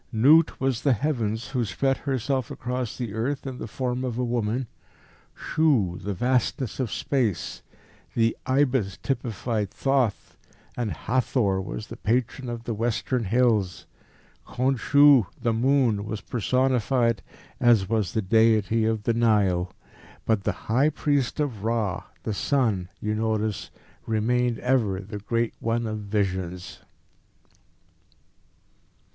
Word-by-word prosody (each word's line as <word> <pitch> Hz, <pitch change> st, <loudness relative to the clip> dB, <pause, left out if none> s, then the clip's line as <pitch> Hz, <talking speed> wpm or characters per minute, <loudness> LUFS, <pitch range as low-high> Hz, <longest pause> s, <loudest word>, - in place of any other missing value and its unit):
"Nut 145 Hz, +8 st, +5 dB
was 130 Hz, -3 st, 0 dB
the 140 Hz, -, +3 dB
Heavens, 115 Hz, -3 st, -1 dB
who 125 Hz, -3 st, 0 dB
spread 135 Hz, +7 st, 0 dB
herself 130 Hz, -2 st, -1 dB
across 125 Hz, -1 st, -4 dB
the 120 Hz, -5 st, -4 dB
earth 130 Hz, +6 st, -2 dB
in 130 Hz, -2 st, -5 dB
the -, -, -5 dB
form 125 Hz, +2 st, -2 dB
of 120 Hz, -3 st, -3 dB
a 125 Hz, -, 0 dB
woman; 120 Hz, +1 st, -1 dB, 0.7 s
Shu, 125 Hz, -, +1 dB
the 100 Hz, +1 st, -3 dB
vastness 125 Hz, +2 st, 0 dB
of 125 Hz, -5 st, -1 dB
space; 130 Hz, -, -1 dB, 0.5 s
the 115 Hz, 0 st, +2 dB
ibis 130 Hz, -8 st, +1 dB
typified 115 Hz, -5 st, -2 dB
Thoth, 135 Hz, -5 st, -1 dB, 0.4 s
and 120 Hz, -3 st, -2 dB
Hathor 115 Hz, -5 st, 0 dB
was 105 Hz, +3 st, -6 dB
the -, -, -9 dB
Patron 125 Hz, +3 st, -1 dB
of 120 Hz, -1 st, -5 dB
the 115 Hz, -, -3 dB
Western 115 Hz, +2 st, -1 dB
Hills; 110 Hz, -3 st, +1 dB, 0.6 s
Khonsu, 135 Hz, -1 st, +4 dB
the 115 Hz, -2 st, 0 dB
moon, 120 Hz, -3 st, +2 dB
was 110 Hz, 0 st, -4 dB
personified, 125 Hz, -1 st, +1 dB, 0.4 s
as 115 Hz, -6 st, +4 dB
was 110 Hz, -4 st, 0 dB
the 110 Hz, -, 0 dB
deity 110 Hz, +1 st, +3 dB
of 110 Hz, -1 st, 0 dB
the 115 Hz, -, +1 dB
Nile. 100 Hz, -6 st, +2 dB, 0.5 s
But 110 Hz, -4 st, +1 dB
the 105 Hz, -, +2 dB
high 130 Hz, +7 st, +3 dB
priest 145 Hz, -3 st, 0 dB
of 125 Hz, -9 st, -2 dB
Ra, 110 Hz, -5 st, -1 dB, 0.2 s
the 110 Hz, -, -2 dB
sun, 105 Hz, -7 st, 0 dB
you 105 Hz, 0 st, -2 dB
notice, 110 Hz, -1 st, -1 dB, 0.4 s
remained 120 Hz, +2 st, +1 dB
ever 120 Hz, -7 st, +1 dB
the 105 Hz, +2 st, -7 dB
Great 115 Hz, +3 st, -1 dB
One 115 Hz, +1 st, -1 dB
of 110 Hz, -1 st, -3 dB
Visions." 95 Hz, -4 st, -3 dB
115 Hz, 130 wpm, -25 LUFS, 105-130 Hz, 0.7 s, Nut